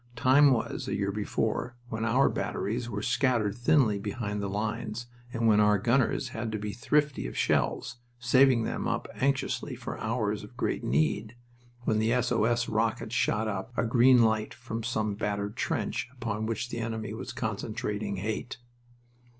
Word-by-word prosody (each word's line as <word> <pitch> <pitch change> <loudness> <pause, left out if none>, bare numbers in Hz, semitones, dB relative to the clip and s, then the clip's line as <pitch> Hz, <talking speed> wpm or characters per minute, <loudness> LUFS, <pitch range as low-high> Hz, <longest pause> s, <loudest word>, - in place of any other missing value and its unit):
Time 130 +4 +6
was, 125 -4 -1
a - - -1
year 100 0 0
before, 110 +3 -2
when 110 0 -3
our 125 +4 +4
batteries 120 +3 -2
were 105 -1 -4
scattered 120 -4 +2
thinly 120 -4 +3
behind 105 0 -3
the 100 - -2
lines 110 +3 -3 0.3
and 115 -2 -1
when 105 -1 +5
our 105 0 +5
gunners 120 +4 +1
had 115 -1 -4
to 110 - -2
be 105 0 -4
thrifty 145 - +1
of - - -7
shells, - - 0 0.2
saving 125 0 +4
them - - -2
up - - -1
anxiously 140 0 -1
for - - -6
hours 110 -2 -1
of 120 +4 -13
great - - -1
need, 80 - 0 0.5
when 110 -3 +1
the 110 +1 +2
S 125 0 +1
O 115 -3 +3
S 120 +1 +1
rocket 110 +1 -1
shot 110 -2 +1
up 105 +3 -4
a - - +2
green 120 +1 +6
light 110 -1 +1
from 115 -1 -5
some 110 -2 -1
battered 100 0 -2
trench 120 - -2
upon 110 -4 -3
which 115 +2 -2
the 115 - -4
enemy 110 -1 -3
was - - -6
concentrating 105 -1 -3
"hate." 110 +5 -4
115 Hz, 170 wpm, -29 LUFS, 105-120 Hz, 0.5 s, Time